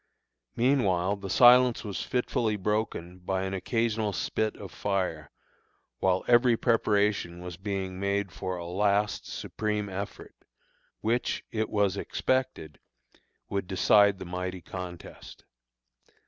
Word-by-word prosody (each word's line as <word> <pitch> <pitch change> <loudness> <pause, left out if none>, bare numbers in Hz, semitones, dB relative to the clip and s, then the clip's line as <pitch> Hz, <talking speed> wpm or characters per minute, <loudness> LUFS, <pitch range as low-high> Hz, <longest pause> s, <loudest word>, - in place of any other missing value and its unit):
Meanwhile 100 -7 +2
the 100 -1 -7
silence 125 +2 +6
was 100 -5 -4
fitfully 120 -3 0
broken 100 -3 -2
by 95 +1 -2
an 95 0 -3
occasional 110 +2 -1
spit 110 +2 -1
of 100 - -9
fire, 90 -7 -2 0.7
while 95 0 +1
every 120 -1 +5
preparation 105 -6 +1
was 90 -1 -7
being 95 0 -4
made 100 -1 -1
for 95 +1 -4
a 85 - -6
last, 100 +3 0
supreme 105 -1 -3
effort, 100 +1 -6 0.7
which, 115 +3 0
it 110 -1 -1
was 100 -3 +1
expected, 130 - -2 0.7
would 100 -2 -3
decide 100 +1 +4
the 95 - -8
mighty 90 +1 -4
contest. 90 -2 -9
100 Hz, 120 wpm, -28 LUFS, 95-110 Hz, 0.7 s, silence